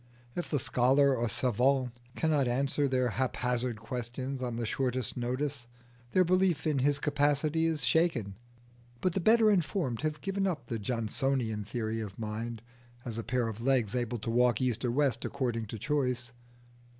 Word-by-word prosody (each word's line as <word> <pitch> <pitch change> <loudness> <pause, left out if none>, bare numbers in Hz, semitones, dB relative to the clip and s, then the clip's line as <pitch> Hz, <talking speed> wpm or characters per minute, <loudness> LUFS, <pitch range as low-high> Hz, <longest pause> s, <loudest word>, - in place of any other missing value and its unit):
If 175 - -3
the 150 - +1
scholar 135 +1 +3
or 120 -1 0
savant 125 +3 +2 0.2
cannot 150 -5 +2
answer 140 +3 +1
their 130 -2 +1
haphazard 125 -1 -1
questions 125 +3 -4
on 120 -2 -2
the 115 0 -2
shortest 125 +1 -1
notice, 125 +1 -2 0.4
their 185 - +5
belief 180 -3 +2
in 150 -3 +1
his 140 +2 +2
capacity 150 +2 +1
is 155 -6 0
shaken. 130 - +2 0.7
But 180 +4 0
the 190 - 0
better 220 +3 +5
informed 170 - 0
have 155 0 -2
given 195 0 -1
up 155 -10 -3
the 115 -1 -3
Johnsonian 115 0 -1
theory 110 +1 -3
of 100 -3 -7
mind 115 +1 -4 0.4
as 115 -2 -4
a - - -3
pair 125 -1 0
of 110 0 -5
legs 125 -5 +2
able 120 -1 -1
to 115 +1 -4
walk 120 -1 +3
east 125 -2 0
or 125 - +1
west 135 -1 +1
according 120 -4 -2
to 110 - -6
choice. 125 -1 -1
125 Hz, 165 wpm, -30 LUFS, 120-145 Hz, 0.7 s, their